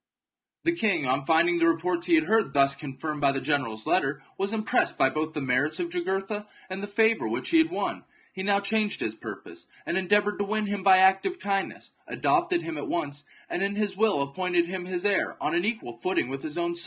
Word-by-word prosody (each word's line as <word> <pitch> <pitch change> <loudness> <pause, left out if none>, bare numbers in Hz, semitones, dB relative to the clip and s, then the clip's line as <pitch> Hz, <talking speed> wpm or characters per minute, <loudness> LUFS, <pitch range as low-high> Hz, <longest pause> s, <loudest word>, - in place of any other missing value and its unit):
The 335 - +3
king, 200 - +1
on 135 +2 0
finding 170 +2 +3
the 165 - +4
reports 170 +1 0
he 170 - +5
had 155 - +4
heard 215 -6 +2
thus 140 -1 +4
confirmed 145 +1 -6
by 140 -1 +4
the 135 - -2
general's 130 -7 -1
letter, 135 0 +1 0.2
was 195 +1 -1
impressed 215 -1 +1
both 135 0 +3
by 155 +1 +1
the 155 -1 -6
merits 130 +4 +1
of 345 - -2
Jugurtha 210 - -3 0.2
and 190 +1 -4
the 205 - -4
favour 220 +2 +2
which - - -3
he 330 - +5
had 320 0 +3
won. 350 - -3 0.3
He 190 - -6
now 200 0 +2
changed 210 0 0
his 110 - -2
purpose, - - -10 0.2
and 170 - -1
endeavoured 205 +2 +2
to 205 - 0
win 215 +1 -1
him 205 -1 -3
by 190 -1 +7
active 190 - +3
kindness, 195 -1 -3 0.2
adopted 355 -1 +1
him 330 - -5
at - - -5
once, 145 -3 -3 0.2
and - - -3
in 200 +1 0
his 205 -2 -1
will 205 -8 +2
appointed 175 +4 0
him 180 +1 -5
his 180 0 -4
heir 200 -2 +1
on 155 - -1
an 175 +2 +1
equal 210 - -4
footing 180 -4 0
with 135 0 -5
his 155 0 -6
own 170 0 -1
sons. 170 - -3
185 Hz, 225 wpm, -26 LUFS, 150-205 Hz, 0.3 s, by